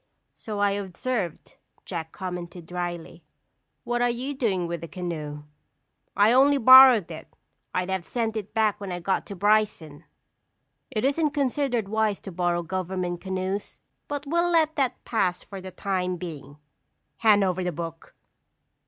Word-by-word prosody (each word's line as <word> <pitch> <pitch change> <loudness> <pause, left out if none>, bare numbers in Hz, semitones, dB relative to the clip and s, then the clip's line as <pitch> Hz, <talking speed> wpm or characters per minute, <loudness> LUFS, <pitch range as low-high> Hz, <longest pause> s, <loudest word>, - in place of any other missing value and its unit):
"So 215 -2 -7
I 205 0 +2
observe," 200 -1 -3 0.5
Jack 160 -3 -5
commented 180 -2 -6
dryly. 175 -1 -5 0.6
"What 240 0 -1
are 245 - +3
you 250 +4 -3
doing 205 -10 0
with 170 -1 -4
the 165 - -6
canoe?" 155 -5 -5 0.7
"I 205 +2 +5
only 275 +3 +5
borrowed 255 -7 +8
it. 160 0 -8 0.4
I'd 185 +1 -2
have 190 -2 -1
sent 225 +2 -2
it 210 -2 -5
back 215 -2 +1
when 195 -2 -5
I 175 - -3
got 190 +2 -1
to 200 - -7
Bryson." 205 -7 +1 0.8
"It 215 +2 -1
isn't 300 +2 +1
considered 265 -5 0
wise 215 -1 0
to 195 - -8
borrow 175 0 0
government 180 0 -3
canoes. 190 +1 -4 0.3
But 290 0 -4
we'll 340 +4 +1
let 320 -2 +2
that 260 -4 -1
pass 185 -6 0
for 195 -2 -9
the 190 - -7
time 185 -1 -2
being. 155 -4 -8 0.6
Hand 210 -3 +5
over 185 -1 0
the 180 - -1
book!" 165 0 -7
195 Hz, 155 wpm, -26 LUFS, 175-235 Hz, 0.8 s, borrowed